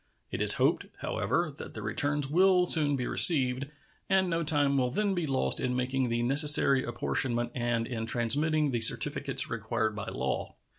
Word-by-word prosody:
It - - -5
is - - +6
hoped, - - 0
however, - - -2
that - - -10
the - - -7
returns 145 -1 -2
will 180 +4 +2
soon 150 -4 +2
be 125 -2 -4
received, 135 -6 +3 0.4
and 190 -1 +1
no 165 0 -1
time 145 -2 +2
will 125 -2 0
then 205 +9 -1
be 175 -4 -3
lost 135 -1 -1
in 125 -1 -2
making 125 0 -2
the 120 0 -2
necessary 140 0 +4
apportionment 120 0 -2
and 120 -2 -2
in 115 -2 -6
transmitting 145 +6 0
the 120 -2 -3
certificates 110 - +1
required 110 -1 -3
by 105 -2 -6
law. - - -4
135 Hz, 175 wpm, -28 LUFS, 120-150 Hz, 0.4 s, is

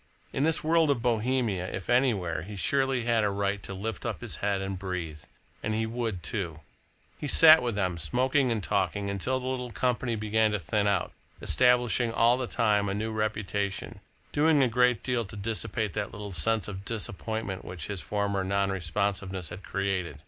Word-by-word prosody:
In - - -1
this 160 +2 +2
world 160 0 +3
of 120 -5 +1
Bohemia, 115 -5 0
if 95 - -5
anywhere, 120 -9 +2
he 100 +5 -8
surely 135 +2 +1
had 115 -2 +2
a 105 - +2
right 100 0 -1
to 100 - -6
lift 110 +4 -4
up - - -3
his - - -4
head 100 -1 0
and 95 -1 -4
breathe 90 -5 -4 0.4
and 110 - -1
he 110 0 0
would 110 -6 -3
do 85 -1 -3
it. - - -14 0.6
He 150 - -3
sat 160 +2 +8
with 120 -3 -2
them, 90 -4 -1
smoking 130 - +1
and 110 -3 -1
talking, 100 +2 0
until 125 +7 -1
the 125 - -7
little 130 -1 -2
company 125 0 0
began 110 0 +1
to 105 - 0
thin 105 +5 0
out, 100 -3 +1 0.3
establishing 125 - +3
all 115 +1 +4
the 125 - -2
time 105 -3 +2
a 100 - -1
new 110 +2 -2
reputation, 105 -1 -2 0.3
doing 150 -1 +4
a - - +4
great 125 0 +2
deal 125 -2 0
to 100 - -10
dissipate 110 -1 -2
that 100 - -3
little 105 -1 -7
sense 110 +5 0
of 95 -1 -6
disappointment 110 -2 -3
which 90 -4 -6
his 100 -4 -4
former 100 -2 -1
non 100 +1 +1
responsiveness 95 0 -2
had - - -8
created. 95 -6 -2
105 Hz, 190 wpm, -28 LUFS, 95-120 Hz, 0.6 s, sat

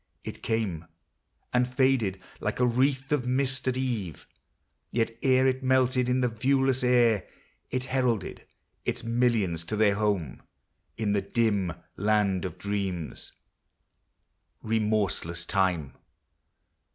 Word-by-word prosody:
It - - -7
came, 100 -8 -1 0.7
And 125 0 +3
faded 125 -7 +2 0.2
like - - -2
a 125 - +4
wreath 130 +3 +1
of 135 -4 +1
mist 130 0 0
at 130 0 +1
eve; 115 - -3 0.6
Yet 115 -1 0
ere 130 -1 +4
it 130 0 +1
melted 130 -1 +2
in 125 +1 +2
the 125 - +3
viewless 130 +2 +1
air 120 -4 +3 0.4
It 130 0 -2
heralded 125 -6 -1 0.4
its - - -2
millions 115 -8 +1
to 110 - -3
their 105 -1 +4
home 100 - -1 0.6
In 105 -2 0
the 100 - +2
dim 100 -4 0 0.2
land 100 -2 +1
of 90 - -5
dreams 95 -5 -4 1.3
MEMORY. 110 0 +1
300 - - 0
Remorseless 90 -5 -1
Time 90 -9 0
115 Hz, 125 wpm, -27 LUFS, 100-130 Hz, 1.3 s, a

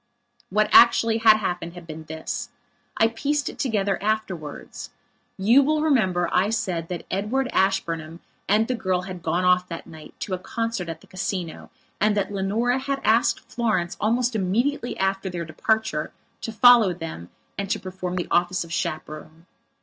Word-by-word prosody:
What 210 +2 +1
had - - +12
actually 230 -1 0
happened 190 -6 +3
had 175 -1 -10
been 160 -1 -9
this. 160 0 -5 0.5
I 225 - +5
pieced 285 +5 -1
it - - -11
together 205 -6 0
afterwards. 195 -8 -4 0.5
You 230 +8 +5
will 305 +2 +1
remember 190 - +2
I 190 +3 +3
said 185 -7 -2
that 175 -2 -5
Edward 215 +8 0
Ashburnham 165 -4 0 0.3
and 215 +3 +3
the 255 - 0
girl 185 -6 -1
had 180 -1 -7
gone 180 +2 0
off, 180 0 +3
that 165 -1 -6
night, 155 -2 -13
to 190 - -3
a 185 - -2
concert 230 -3 -3
at 165 0 -6
the - - -17
Casino 185 -3 -5 0.3
and 210 0 +2
that 205 - -1
Leonora 220 +6 0
had 275 +1 -2
asked 225 +2 +3
Florence, 215 -7 -1
almost 235 +2 +1
immediately 235 +7 0
after 195 0 -1
their 175 -2 -4
departure, 160 0 -1 0.3
to 225 - -4
follow 225 -4 +6
them 160 - -7 0.3
and 200 -1 -4
to - - 0
perform 185 -1 -5
the 175 - -2
office 175 +1 +2
of 165 -1 -9
chaperone. 155 +1 -5
195 Hz, 165 wpm, -24 LUFS, 175-225 Hz, 0.5 s, had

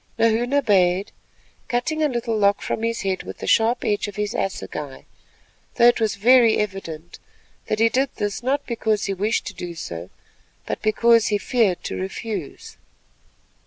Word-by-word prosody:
Nahoon 230 +2 +2
obeyed, 195 -7 +2 0.6
cutting 280 +6 -1
a 305 - +3
little 235 -2 -2
lock 200 -1 +2
from - - -3
his 230 0 -1
head 190 -1 -1
with - - -9
the - - -7
sharp 230 +2 +2
edge 205 0 0
of 205 - -8
his 210 +1 -2
assegai, 150 -7 -4 0.7
though 235 - +4
it 240 - +1
was 215 -3 0
very 230 +2 +5
evident 175 -6 -5 0.5
that 215 - 0
he 225 +1 +4
did 265 +4 +1
this 205 +1 -3
not 275 +4 -1
because 220 -3 -1
he 195 - -1
wished 210 +4 -1
to - - -6
do 175 -1 -7
so, 85 - -7 0.6
but - - -4
because 230 +1 +4
he 205 - +1
feared 210 -5 +1
to - - -4
refuse. 190 -3 -6
215 Hz, 165 wpm, -22 LUFS, 195-235 Hz, 0.7 s, very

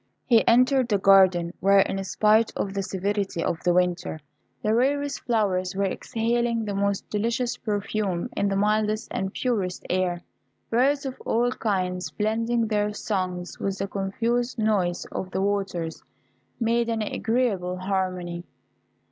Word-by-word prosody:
He 230 -3 +5
entered 255 +2 +4
the 205 - +3
garden, 185 -3 +5
where, 195 +1 +5
in 195 0 -1
spite 215 +3 +3
of 195 - -2
the 200 - -1
severity 195 -2 -2
of 165 - -1
the 180 - +3
winter, 175 -2 0 0.4
the 215 - +2
rarest 285 +4 +1
flowers 190 -6 0
were 200 +1 +1
exhaling 230 +3 -1
the 205 - -3
most 200 0 -1
delicious 235 +4 0
perfume 205 -4 -2
in 200 - +1
the 195 - 0
mildest 215 +2 +1
and 190 0 -2
purest 200 -8 -2
air. 180 -1 0 0.5
Birds 275 +5 +2
of 265 -1 -6
all 240 +2 +1
kinds 180 -7 -1
blending 225 +6 0
their 210 -1 0
songs 185 -4 -3
with 195 -1 -2
the 195 - -2
confused 230 +6 -1
noise 200 -6 +1
of 185 - -4
the 190 - -2
waters, 195 -5 -2 0.6
made 235 0 +1
an 225 -1 0
agreeable 210 -5 -1
harmony. 185 -2 -2
200 Hz, 145 wpm, -25 LUFS, 185-230 Hz, 0.6 s, He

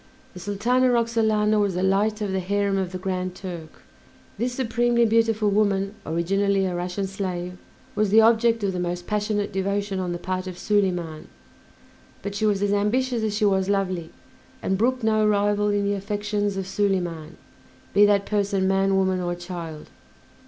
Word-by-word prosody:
The 180 - -9
Sultana 225 +7 +1
Roxalana 220 -3 +2
was 200 -3 +1
the 180 - -1
light 210 +3 +1
of 205 -2 -1
the 190 - 0
harem 200 +1 0
of 190 -2 -1
the 185 - -4
Grand 185 -1 -3
Turk. 170 - -9 0.6
This 245 +2 0
supremely 240 -1 +1
beautiful 225 -2 +2
woman, 200 -1 +1
originally 195 +4 +1
a 185 - -2
Russian 180 +3 -3
slave, 180 -2 -4 0.3
was 215 -1 +1
the 215 +3 +6
object 230 0 +4
of 195 -1 0
the 180 - -3
most 175 0 -3
passionate 210 -1 -1
devotion 200 0 -1
on 180 -1 -2
the 175 - -2
part 185 +1 -4
of 180 -1 -7
Soliman; 180 -7 -1 1.0
but 200 - -4
she 215 +2 0
was 205 -1 +1
as 205 0 +1
ambitious 235 +4 +1
as 215 -1 -1
she 215 - +2
was 190 -1 +2
lovely, 185 -4 -1 0.5
and 190 - +1
brooked 250 +4 0
no 215 -1 +3
rival 205 0 +2
in 205 0 +1
the 200 - +1
affections 205 0 -2
of 190 - -3
Soliman, 180 -5 -2 0.6
be 205 - +6
that 200 -1 +2
person 200 -2 0
man, 195 0 +2
woman, 190 -1 +1
or 175 0 -2
child. 175 -3 -8
200 Hz, 175 wpm, -24 LUFS, 185-210 Hz, 1.0 s, the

